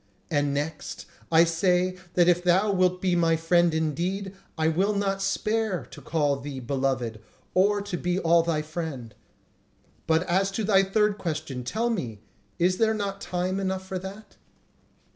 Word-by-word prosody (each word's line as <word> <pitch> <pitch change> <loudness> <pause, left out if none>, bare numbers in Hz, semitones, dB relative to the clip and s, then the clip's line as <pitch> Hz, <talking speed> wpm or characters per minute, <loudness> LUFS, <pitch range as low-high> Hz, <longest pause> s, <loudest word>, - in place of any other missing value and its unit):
And 145 -2 +1
next, 150 +2 -4 0.3
I 165 0 +7
say 180 +2 +1 0.2
that 175 -1 +5
if 175 0 +3
thou 185 +4 +3
wilt 185 -1 +1
be 180 -2 +2
my 165 -1 +3
friend 170 +1 +3
indeed, 175 +5 -2 0.2
I 160 0 +2
will 190 +6 +1
not 195 -1 0
spare 215 0 -1
to - - -11
call 145 -4 0
thee 135 -1 -6
beloved, 125 -3 -2 0.3
or 200 +2 +3
to 200 -3 -4
be 180 +1 -1
all 170 -2 +4
thy 165 -2 -1
friend. 155 -8 -6 0.9
But 160 +1 +3
as 190 +2 +1
to 220 - -1
thy 195 -2 +5
third 210 +1 +1
question; 155 -7 -4
tell 225 - -1
me, 120 - -3 0.4
is 185 +2 +2
there 220 -1 +3
not 200 -1 -3
time 185 +2 -2
enough 190 -1 -2
for 190 -1 -4
that?" 195 +3 -10
180 Hz, 160 wpm, -26 LUFS, 160-195 Hz, 0.9 s, I